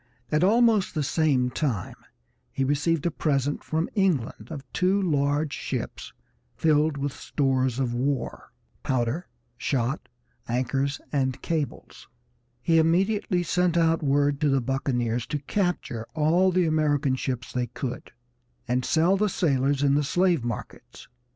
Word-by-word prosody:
At 155 Hz, +2 st, +2 dB
almost 220 Hz, -2 st, +3 dB
the 155 Hz, -, 0 dB
same 135 Hz, -4 st, +1 dB
time 125 Hz, -, -2 dB, 0.6 s
he 135 Hz, -, -1 dB
received 145 Hz, +3 st, +1 dB
a 170 Hz, -, +2 dB
present 145 Hz, -2 st, -1 dB
from 160 Hz, +2 st, -1 dB
England 160 Hz, -, 0 dB
of 145 Hz, -4 st, -6 dB
two 185 Hz, +2 st, +2 dB
large 145 Hz, -4 st, +1 dB
ships -, -, -5 dB, 0.4 s
filled 155 Hz, -1 st, +2 dB
with 140 Hz, 0 st, -2 dB
stores 130 Hz, -3 st, 0 dB
of 130 Hz, -3 st, -1 dB
war, 130 Hz, +1 st, -2 dB, 0.3 s
powder, 130 Hz, +6 st, -1 dB, 0.3 s
shot, 135 Hz, +2 st, -1 dB, 0.4 s
anchors, 135 Hz, +3 st, -1 dB
and 130 Hz, -2 st, 0 dB
cables. 160 Hz, -4 st, -4 dB, 0.6 s
He 165 Hz, -1 st, +4 dB
immediately 180 Hz, +3 st, +2 dB
sent 180 Hz, 0 st, +1 dB
out 165 Hz, 0 st, +3 dB
word 145 Hz, 0 st, +1 dB
to 150 Hz, -, +3 dB
the 135 Hz, 0 st, +3 dB
buccaneers 120 Hz, -2 st, -1 dB
to 150 Hz, -, -2 dB
capture 145 Hz, -, -2 dB
all 170 Hz, +5 st, +3 dB
the 180 Hz, -1 st, +2 dB
American 150 Hz, -4 st, +1 dB
ships 130 Hz, -1 st, -4 dB
they 125 Hz, -1 st, -1 dB
could, 125 Hz, +1 st, -6 dB, 0.6 s
and 125 Hz, +1 st, 0 dB
sell 170 Hz, +7 st, +3 dB
the 210 Hz, +1 st, +1 dB
sailors 140 Hz, -5 st, +1 dB
in 140 Hz, -1 st, +4 dB
the 145 Hz, +1 st, +2 dB
slave 175 Hz, -1 st, +2 dB
markets. 120 Hz, -3 st, -7 dB
145 Hz, 140 wpm, -26 LUFS, 130-165 Hz, 0.6 s, He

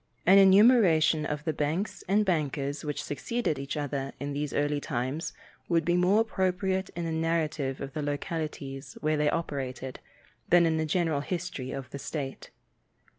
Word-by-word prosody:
An 195 Hz, +3 st, +8 dB
enumeration 190 Hz, -6 st, +6 dB
of 150 Hz, 0 st, -3 dB
the 160 Hz, -, -1 dB
banks 155 Hz, +9 st, -2 dB
and 205 Hz, +3 st, +3 dB
bankers 145 Hz, -5 st, -1 dB
which 150 Hz, -1 st, -3 dB
succeeded 150 Hz, -, -2 dB
each 140 Hz, +2 st, -4 dB
other 140 Hz, -2 st, -3 dB
in 140 Hz, +1 st, -4 dB
these 145 Hz, 0 st, -2 dB
early 145 Hz, 0 st, 0 dB
times 130 Hz, +4 st, -3 dB, 0.4 s
would 165 Hz, -2 st, +2 dB
be 175 Hz, -, +2 dB
more 185 Hz, +5 st, +4 dB
appropriate 190 Hz, -3 st, 0 dB
in 170 Hz, 0 st, -3 dB
a 165 Hz, -, -2 dB
narrative 160 Hz, -4 st, -1 dB
of 135 Hz, -1 st, -6 dB
the 155 Hz, -, -3 dB
localities 145 Hz, -2 st, -4 dB
where 155 Hz, 0 st, +1 dB
they 150 Hz, 0 st, +2 dB
operated 135 Hz, -5 st, -4 dB, 0.5 s
than 175 Hz, -1 st, +6 dB
in 160 Hz, -1 st, +1 dB
a 160 Hz, -, 0 dB
general 160 Hz, -3 st, +1 dB
history 170 Hz, -5 st, -4 dB
of 135 Hz, 0 st, -5 dB
the 140 Hz, -, -6 dB
state. 140 Hz, -1 st, -5 dB
155 Hz, 165 wpm, -28 LUFS, 140-175 Hz, 0.5 s, An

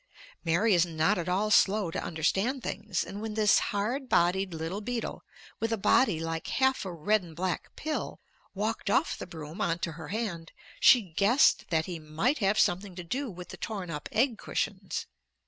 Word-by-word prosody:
Mary 180 Hz, +6 st, +3 dB
is 175 Hz, -2 st, +5 dB
not 160 Hz, 0 st, +1 dB
at 175 Hz, -, -3 dB
all 205 Hz, +4 st, +1 dB
slow 200 Hz, -4 st, +4 dB
to -, -, -3 dB
understand 195 Hz, -, 0 dB
things, 205 Hz, -3 st, -2 dB
and 200 Hz, +1 st, -7 dB
when 220 Hz, -1 st, -4 dB
this 215 Hz, -2 st, +5 dB
hard 240 Hz, +7 st, -2 dB
bodied 185 Hz, +2 st, +2 dB
little 165 Hz, +5 st, -4 dB
beetle, 240 Hz, +1 st, -4 dB, 0.4 s
with 225 Hz, 0 st, -1 dB
a 225 Hz, -, +1 dB
body 195 Hz, -3 st, +3 dB
like 165 Hz, 0 st, -3 dB
half 265 Hz, 0 st, +1 dB
a 190 Hz, -, -4 dB
red 205 Hz, +6 st, +1 dB
and 165 Hz, -3 st, -12 dB
black 185 Hz, +2 st, -3 dB
pill, 310 Hz, 0 st, -4 dB, 0.4 s
walked 215 Hz, +1 st, -2 dB
off 270 Hz, +10 st, +2 dB
the -, -, -7 dB
broom 160 Hz, +3 st, -8 dB
on 165 Hz, -, +1 dB
to 170 Hz, -, -3 dB
her 160 Hz, +1 st, -9 dB
hand, 180 Hz, -6 st, -4 dB, 0.3 s
she 245 Hz, -3 st, +7 dB
guessed 200 Hz, -, +3 dB
that 160 Hz, -2 st, +1 dB
he 175 Hz, -3 st, -5 dB
might 160 Hz, -, 0 dB
have 200 Hz, 0 st, +2 dB
something 185 Hz, -2 st, +1 dB
to 180 Hz, -, -6 dB
do 260 Hz, +10 st, -3 dB
with 180 Hz, -2 st, -9 dB
the -, -, -8 dB
torn 195 Hz, -6 st, -5 dB
up 150 Hz, -1 st, -5 dB
egg 235 Hz, 0 st, +1 dB
cushions. 195 Hz, -3 st, -3 dB
195 Hz, 190 wpm, -29 LUFS, 170-220 Hz, 0.4 s, she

